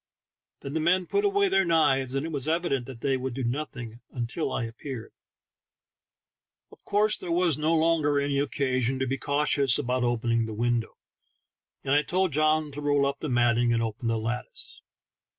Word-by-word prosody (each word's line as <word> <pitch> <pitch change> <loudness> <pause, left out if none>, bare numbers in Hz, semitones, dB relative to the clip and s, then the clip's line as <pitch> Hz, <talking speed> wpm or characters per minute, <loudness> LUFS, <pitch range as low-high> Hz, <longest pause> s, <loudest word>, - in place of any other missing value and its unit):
Then 140 - -6
the 160 - 0
men 180 +3 +2
put 400 - 0
away 400 0 +3
their 195 - +3
knives, 135 -6 +2
and 135 +2 -1
it 165 - -4
was 140 -2 -1
evident 155 -6 0
that 125 -4 -10
they 135 -1 +1
would 130 -1 -4
do 135 - -3
nothing 125 -3 -4 0.3
till 155 +7 -3
I 125 - -1
appeared. 115 +1 -7 1.6
Of - - -18
course 210 +1 +2
there 175 - -6
was 170 -2 +3
no 155 +2 +2
longer 155 -3 +2
any 140 0 0
occasion 130 -3 0
to 130 - -1
be 135 +1 -2
cautious 145 -3 +2
about 125 -2 -1
opening 115 -1 +1
the 110 - -6
window, 120 0 -1 0.9
and 135 - 0
I 145 - +5
told 180 +2 0
John 155 0 +2
to 145 +1 -7
roll 145 -1 +2
up 140 0 -2
the 155 - -4
matting 120 -1 +3
and 115 0 +1
open 115 +2 -4
the 115 0 +1
lattice. 115 +3 -5
140 Hz, 185 wpm, -27 LUFS, 120-155 Hz, 1.6 s, I